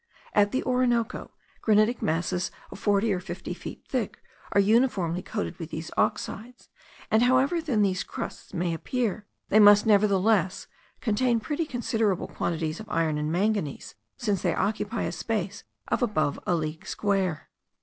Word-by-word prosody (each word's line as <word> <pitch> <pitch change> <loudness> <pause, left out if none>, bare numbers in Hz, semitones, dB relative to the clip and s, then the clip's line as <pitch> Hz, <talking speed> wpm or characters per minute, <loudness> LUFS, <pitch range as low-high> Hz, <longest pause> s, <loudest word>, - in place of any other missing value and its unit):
At 205 0 +4
the 260 - 0
Orinoco, 250 -2 0 0.3
granitic 215 +2 +3
masses 175 +3 0 0.2
of - - -9
forty 205 +1 +2
or 185 - -1
fifty 180 - -6
feet - - -9
thick - - -2 0.3
are - - +3
uniformly 200 -5 +2
coated 210 -1 -4
with 165 -2 -6
these 160 0 -6
oxides; 240 +4 -2 0.4
and, 220 +1 +5
however 260 +7 +3
thin 250 -10 +1
these 185 -2 +1
crusts - - -7
may 175 -1 -1
appear, 210 +3 -2 0.2
they 215 - +5
must 205 0 +8
nevertheless 200 -2 +3 0.4
contain 235 +1 +2
pretty 300 +7 -2
considerable 225 -7 0
quantities 160 -1 -2
of 215 0 -9
iron 160 -4 +1
and 150 +1 -1
manganese, 195 -4 -1 0.2
since 210 -7 -1
they - - +1
occupy 210 +3 -1
a - - -2
space 210 -1 -3 0.2
of - - 0
above 155 - +1
a 175 - +3
league 155 0 -4
square. 195 -6 -1
205 Hz, 150 wpm, -27 LUFS, 180-230 Hz, 0.4 s, must